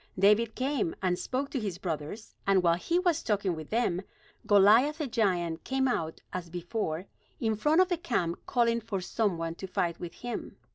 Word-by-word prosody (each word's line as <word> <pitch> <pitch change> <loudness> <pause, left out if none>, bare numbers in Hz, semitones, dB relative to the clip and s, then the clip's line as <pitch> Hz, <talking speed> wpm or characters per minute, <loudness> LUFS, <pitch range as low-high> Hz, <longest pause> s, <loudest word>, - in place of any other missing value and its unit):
David 210 +4 +4
came, 260 - -1
and 180 -1 +1
spoke 270 +2 -2
to 270 - -1
his 200 -6 -3
brothers; 175 +4 -5
and 195 -2 +4
while 170 -1 +5
he 260 - 0
was 350 -3 +2
talking 200 -3 0
with 155 -1 -8
them, 215 -6 +1 0.5
Goliath 215 +9 +6
the 310 - -2
giant 185 -9 0
came 265 0 +1
out 160 -10 -2
as 180 -2 -4
before 175 0 -3 0.3
in 220 -1 +1
front 300 - +4
of 370 - +3
the 355 - +1
camp 180 - -1
calling 235 -1 +2
for 210 -3 -3
some 200 0 0
one 165 0 -3
to 190 +3 -7
fight 170 -2 -1
with 175 -1 -7
him. 240 - -5
205 Hz, 190 wpm, -29 LUFS, 175-245 Hz, 0.5 s, Goliath